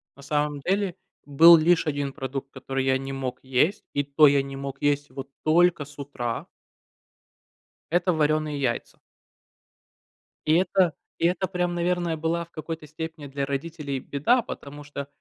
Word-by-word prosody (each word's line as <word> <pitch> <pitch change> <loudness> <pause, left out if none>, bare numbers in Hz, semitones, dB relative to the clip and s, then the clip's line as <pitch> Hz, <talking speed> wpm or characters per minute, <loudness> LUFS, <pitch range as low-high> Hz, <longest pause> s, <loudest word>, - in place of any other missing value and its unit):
на 140 - -15
самом 150 0 -1
деле, 195 +2 0 0.3
был 165 +4 +8
лишь 165 +2 +3
1 145 -2 -2
продукт, 135 -1 -5
который 135 0 -3
я 130 0 +3
не 135 +1 -6
мог 130 -2 -4
есть, 135 +10 +1
и 145 - +1
то 140 +2 +5
я 140 0 +4
не 135 0 -7
мог 140 0 -6
есть 145 0 +1
его 135 0 -7 0.2
только 170 -1 +3
с 145 +1 -16
утра. 120 -5 -4 1.4
Это 175 +1 +2
варёные 155 -1 +1
яйца. 125 -3 -2 1.5
И 155 - +4
это, 180 -1 +3 0.2
и - - 0
это 180 +2 +1
прям, 180 -2 -1
наверное, 175 -1 0
была 165 +2 -1
в 170 - -31
какой-то 160 0 -6
степени 160 0 -7
для 140 0 -3
родителей 140 -1 -4
беда, 190 - +2
потому 145 +1 -8
что 140 -1 -6
145 Hz, 160 wpm, -25 LUFS, 140-170 Hz, 1.5 s, был